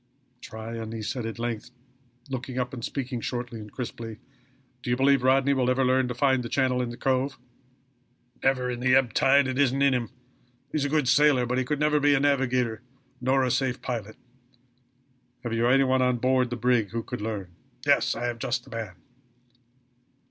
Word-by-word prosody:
"Tryon," 110 Hz, 0 st, -6 dB
said 120 Hz, +2 st, -3 dB
he -, -, -2 dB
at 115 Hz, -, -8 dB
length, 115 Hz, -1 st, -4 dB, 0.6 s
looking 130 Hz, -1 st, -5 dB
up 125 Hz, 0 st, -2 dB
and 120 Hz, -3 st, -6 dB
speaking 130 Hz, -3 st, -3 dB
shortly 120 Hz, -1 st, -4 dB
and 105 Hz, -1 st, -10 dB
crisply, 115 Hz, -3 st, -6 dB, 0.6 s
"do 125 Hz, -, -5 dB
you 120 Hz, -, +2 dB
believe 135 Hz, 0 st, +4 dB
Rodney 135 Hz, +2 st, +3 dB
will 130 Hz, -2 st, +1 dB
ever 130 Hz, +1 st, +2 dB
learn 130 Hz, 0 st, +2 dB
to 125 Hz, -, -4 dB
find 130 Hz, 0 st, +2 dB
the 120 Hz, -, -6 dB
channel 130 Hz, 0 st, +1 dB
to 125 Hz, -, -1 dB
the 120 Hz, 0 st, -7 dB
Cove?" 130 Hz, +1 st, 0 dB, 1.0 s
"Never, 130 Hz, -1 st, +1 dB
in 125 Hz, -1 st, -3 dB
the 130 Hz, +1 st, +3 dB
ebb 130 Hz, -4 st, +3 dB
tide. 140 Hz, +2 st, +4 dB
It 130 Hz, +1 st, -2 dB
isn't 135 Hz, 0 st, +3 dB
in 140 Hz, -1 st, +4 dB
him. 120 Hz, -2 st, -1 dB, 0.6 s
He -, -, -1 dB
is 145 Hz, -, 0 dB
a -, -, -1 dB
good 150 Hz, -3 st, +1 dB
sailor, 140 Hz, -2 st, +4 dB
but 125 Hz, +1 st, 0 dB
he -, -, +1 dB
could 145 Hz, +3 st, -2 dB
never 150 Hz, 0 st, +3 dB
be 145 Hz, 0 st, +4 dB
a -, -, +2 dB
navigator, 130 Hz, -5 st, +1 dB, 0.4 s
nor 130 Hz, +1 st, +2 dB
a 125 Hz, -, +1 dB
safe 130 Hz, 0 st, 0 dB
pilot." 110 Hz, -4 st, -4 dB, 1.3 s
"Have 120 Hz, -2 st, -3 dB
you 115 Hz, +1 st, +2 dB
any 135 Hz, +2 st, +5 dB
one 130 Hz, 0 st, +2 dB
on 125 Hz, -1 st, +2 dB
board 130 Hz, 0 st, +2 dB
the 120 Hz, -, -3 dB
brig 120 Hz, -3 st, +1 dB
who 115 Hz, 0 st, -3 dB
could -, -, -6 dB
learn?" 105 Hz, -4 st, -4 dB, 0.3 s
"Yes -, -, +3 dB
I 120 Hz, +1 st, -3 dB
have 120 Hz, -1 st, -3 dB
just 120 Hz, +1 st, -2 dB
the 130 Hz, -, -16 dB
man." 110 Hz, -6 st, -5 dB
125 Hz, 200 wpm, -26 LUFS, 120-135 Hz, 1.3 s, any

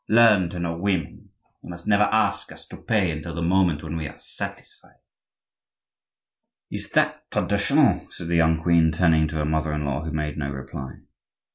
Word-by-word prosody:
Learn 110 Hz, -6 st, +5 dB
to 90 Hz, -, -7 dB
know 85 Hz, -1 st, -2 dB
women. 90 Hz, -3 st, -2 dB, 0.3 s
You -, -, -12 dB
must 85 Hz, 0 st, -9 dB
never 105 Hz, 0 st, +4 dB
ask 110 Hz, 0 st, +1 dB
us -, -, -12 dB
to -, -, -9 dB
pay 100 Hz, -6 st, +1 dB
until 80 Hz, +2 st, -6 dB
the 85 Hz, -, -3 dB
moment 85 Hz, -3 st, +2 dB
when 80 Hz, 0 st, -5 dB
we 80 Hz, -2 st, -3 dB
are -, -, -11 dB
satisfied." -, -, -9 dB, 1.7 s
"Is -, -, -5 dB
that -, -, +1 dB
traditional?" -, -, +2 dB
said 85 Hz, -, -8 dB
the 85 Hz, -, +1 dB
young 80 Hz, -1 st, +2 dB
queen, 85 Hz, -1 st, +4 dB
turning 80 Hz, -2 st, +3 dB
to 80 Hz, -, -7 dB
her 75 Hz, -1 st, 0 dB
mother 80 Hz, 0 st, 0 dB
in 75 Hz, -1 st, -2 dB
law, 70 Hz, +2 st, -2 dB
who 80 Hz, -, -4 dB
made 75 Hz, -1 st, -3 dB
no 70 Hz, -2 st, -2 dB
reply. 65 Hz, -1 st, -7 dB
80 Hz, 180 wpm, -24 LUFS, 75-90 Hz, 1.7 s, Learn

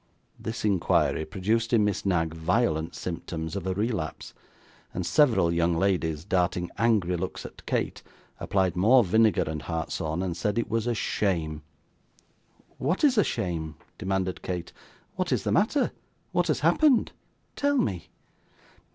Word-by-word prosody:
This 110 Hz, 0 st, -4 dB
inquiry 95 Hz, -5 st, +2 dB
produced 110 Hz, +8 st, -1 dB
in 110 Hz, -3 st, +5 dB
Miss 100 Hz, -1 st, -1 dB
Knag 80 Hz, -3 st, +1 dB
violent 80 Hz, -1 st, 0 dB
symptoms 85 Hz, -1 st, -5 dB
of 95 Hz, -2 st, -4 dB
a 95 Hz, -, -1 dB
relapse; 105 Hz, -, -3 dB, 0.6 s
and 90 Hz, -, -2 dB
several 115 Hz, -, +3 dB
young 85 Hz, 0 st, +2 dB
ladies, 85 Hz, -5 st, 0 dB
darting 90 Hz, -2 st, 0 dB
angry 105 Hz, -6 st, +2 dB
looks 90 Hz, +2 st, -4 dB
at -, -, -11 dB
Kate, -, -, -1 dB, 0.4 s
applied 95 Hz, -3 st, 0 dB
more 115 Hz, +8 st, +5 dB
vinegar 110 Hz, +1 st, +3 dB
and 75 Hz, -1 st, -4 dB
hartshorn, 80 Hz, +1 st, -3 dB
and 90 Hz, -3 st, -2 dB
said 105 Hz, +5 st, -1 dB
it 115 Hz, -, -1 dB
was 115 Hz, +1 st, 0 dB
'a 120 Hz, -, +1 dB
shame.' 80 Hz, -8 st, -1 dB, 1.2 s
'What 160 Hz, -, 0 dB
is 280 Hz, -4 st, +5 dB
a 210 Hz, -, +5 dB
shame?' 80 Hz, -4 st, -3 dB, 0.2 s
demanded 95 Hz, -1 st, -1 dB
Kate. 90 Hz, -2 st, -5 dB, 0.4 s
'What -, -, -1 dB
is -, -, +1 dB
the -, -, -1 dB
matter? -, -, +2 dB, 0.4 s
What 175 Hz, -1 st, +1 dB
has 155 Hz, -4 st, 0 dB
happened? 235 Hz, -, +4 dB, 0.4 s
tell 285 Hz, 0 st, +1 dB
me. 95 Hz, -, -1 dB
95 Hz, 145 wpm, -27 LUFS, 85-115 Hz, 1.2 s, in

